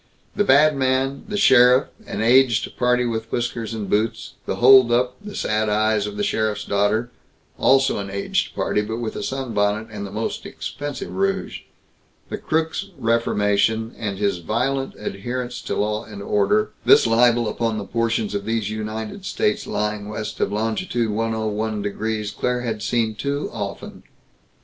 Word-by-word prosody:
The 205 - +2
badman, 135 -3 +3
the 205 -1 -3
sheriff 125 -5 +6 0.2
an - - -3
aged 120 -1 +3
party 125 0 +2
with 115 -1 -3
whiskers 120 -2 -2
and 105 -3 -4
boots 110 +3 -1
the - - -1
holdup, 125 -1 +5
the 210 0 -8
sad 110 0 0
eyes 105 0 +1
of 105 0 -7
the 105 - -1
sheriff's 110 +1 0
daughter 105 +4 +1 0.5
also 135 -3 +3
an 100 -1 -5
aged 100 0 -2
party, 105 - 0
but 110 +2 -4
with 115 -2 -4
a - - -4
sunbonnet 110 -5 -1
and 105 -2 -6
the 100 - -6
most 110 +2 -3
expensive 145 -1 -6
rouge 195 0 -1 0.7
the - - -4
crook's 160 +4 -1
reformation, 110 -1 +1
and 100 -4 -4
his 100 -3 0
violent 135 +9 -1
adherence 125 +4 -4
to - - -3
law 105 +1 -1
and 100 -2 -9
order; 210 - +1
this - - +6
libel 120 0 +4
upon 115 +1 -1
the 100 - -4
portions 115 -1 -1
of 100 -1 -2
these 110 -2 -1
United 110 - -5
States 210 +2 -1
lying 105 -1 -2
west 105 0 -5
of - - 0
longitude 115 - -1
101° 110 -1 -2
Claire 125 0 -1
had 110 -3 -3
seen 110 0 0
too 140 +6 -3
often. 100 -3 -6
115 Hz, 155 wpm, -22 LUFS, 105-125 Hz, 0.7 s, sheriff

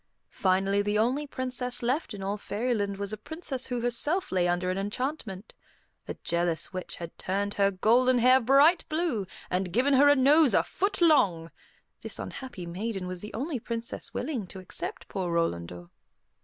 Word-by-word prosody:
Finally 195 -1 +1
the 205 +1 0
only 255 +7 +1
princess 250 -2 -3
left 255 0 -1
in 195 - -7
all 200 +1 -1
Fairyland 205 -1 -2
was 200 +1 -2
a - - -3
princess 275 +1 -4
who 245 -2 -2
herself 265 +10 0
lay 180 -1 +2
under 175 +1 0
an 185 - -2
enchantment. 215 -1 -4 0.5
A - - -4
jealous 170 +1 -1
witch 185 -1 -5
had 170 -1 -8
turned 200 +2 -1
her 200 -1 +3
golden 240 +6 +3
hair 255 +2 +6
bright 280 +8 +5
blue, 310 - -1 0.2
and 180 0 -1
given 260 +8 +2
her 285 +2 +6
a 290 - +6
nose 285 +1 +5
a - - +4
foot 395 0 -2
long. 185 - +3 0.5
This - - -3
unhappy 245 -9 -7
maiden 195 +3 -4
was 180 -1 -5
the 210 - -8
only 270 +3 -2
princess 230 +1 -4
willing 250 -8 -3
to 190 - -10
accept 185 -1 -6
poor 185 -3 -3
Rolandor. 85 - -2
215 Hz, 170 wpm, -28 LUFS, 185-260 Hz, 0.5 s, hair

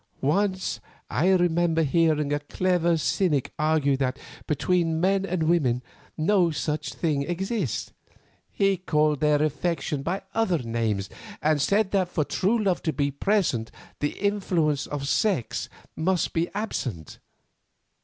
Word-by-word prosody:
Once 190 +6 0 0.3
I 160 +9 +2
remember 175 -3 +3
hearing 155 -1 +2
a 145 - +1
clever 175 +2 +1
cynic 155 -2 0
argue 155 -2 +2
that 130 0 -1 0.3
between 165 +2 +1
men 195 +2 +2
and 175 -2 -1
women 140 -7 +2 0.3
no 175 +2 +3
such 155 -1 -3
thing 150 -4 0
exists. 175 - -2 0.6
He 195 -1 +1
called 150 -4 +1
their 150 0 +3
affection 155 -1 -1
by 180 +7 -3
other 220 -6 +2
names, 115 -6 -2 0.3
and 155 -1 +2
said 200 +5 +2
that 190 -3 +1
for 155 - 0
true 215 +8 +1
love 185 -3 +1
to 160 - 0
be 140 -1 0
present 140 - 0 0.3
the 145 - -1
influence 180 -8 0
of 140 -1 -4
sex 145 - 0 0.3
must 180 +2 0
be 165 +1 0
absent. 125 - -4
160 Hz, 135 wpm, -26 LUFS, 145-185 Hz, 0.6 s, remember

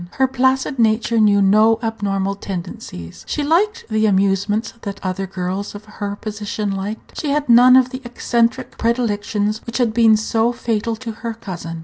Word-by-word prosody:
Her 265 0 +2
placid 260 +1 0
nature 225 0 +2
knew 205 -2 +4
no 215 +3 +5
abnormal 200 -3 -1
tendencies. 180 - -7
She 295 - -2
liked 365 +9 +1
the 220 -1 +1
amusements 200 +2 +1
that 200 -1 -6
other 185 +1 -2
girls 185 +2 -4
of 205 +1 -10
her 205 -1 -5
position 210 0 -4
liked. 195 +3 -6
She 300 - -2
had 290 0 0
none 245 +1 +7
of 255 -1 +4
the 260 0 -6
eccentric 235 -1 -1
predilections 215 -2 -1
which 235 - -3
had 240 -4 +1
been 225 -2 +5
so 225 +2 0
fatal 230 -1 -2
to 230 0 -6
her 230 +1 -6
cousin. 170 -6 -7
220 Hz, 165 wpm, -19 LUFS, 200-235 Hz, -, none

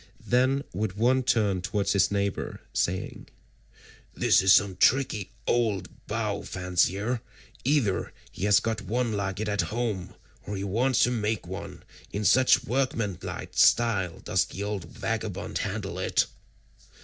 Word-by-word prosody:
Then 130 +3 +2
would 100 +1 -2
one 125 +6 +2
turn 105 -7 +1
towards 100 +2 0
his 100 -2 +3
neighbour 100 -1 -2
saying, 90 +1 -2 0.9
"This - - +4
is 95 0 +4
some 95 -2 +4
tricky 115 -2 +2 0.2
old 110 -5 -1
bow - - -2
fancier; 95 +6 0 0.4
either 130 -8 +1 0.2
he 95 - -4
has 105 -1 +6
got 110 -1 -2
one 115 +3 -1
like 100 -2 -2
it 110 - -2
at 105 -1 +1
home, 110 -5 -3 0.3
or 105 - -3
he 95 - -4
wants 120 +6 +2
to 120 - +3
make 110 -4 -1
one, 95 +3 -7 0.3
in 105 +1 -3
such 130 +4 +5
workmanlike 115 -6 -2
style 105 -7 +3
does - - +1
the 100 - -6
old 100 -4 -3
vagabond 85 - -4
handle - - -3
it." - - +2
105 Hz, 140 wpm, -27 LUFS, 95-120 Hz, 0.9 s, has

